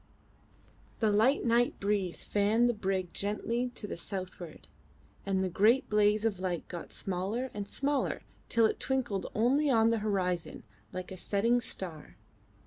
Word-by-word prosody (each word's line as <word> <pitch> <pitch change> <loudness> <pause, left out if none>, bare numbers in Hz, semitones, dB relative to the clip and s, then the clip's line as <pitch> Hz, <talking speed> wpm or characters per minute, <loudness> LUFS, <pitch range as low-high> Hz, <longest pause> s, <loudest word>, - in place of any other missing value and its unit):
The 220 -2 +3
light 225 +8 +3
night 235 +1 +2
breeze 200 -3 -1
fanned 210 +4 +3
the 240 - +2
brig 190 -4 -2
gently 230 +4 -1
to - - -5
the 205 - -5
southward, 185 -3 -7 0.6
and 190 -1 +1
the - - +1
great 215 +9 +3
blaze 210 +1 +3
of 205 -5 0
light 180 -2 -2
got 175 -2 -7
smaller 200 +8 -2
and 205 -1 -4
smaller 285 0 -1 0.3
till 230 -1 +4
it - - 0
twinkled 255 -7 -1
only 270 +7 +3
on 225 -3 +4
the 230 - +1
horizon 185 -5 -1 0.3
like 185 0 -6
a 190 - -6
setting 230 +6 +1
star. 170 -9 -6
210 Hz, 150 wpm, -31 LUFS, 190-235 Hz, 0.6 s, till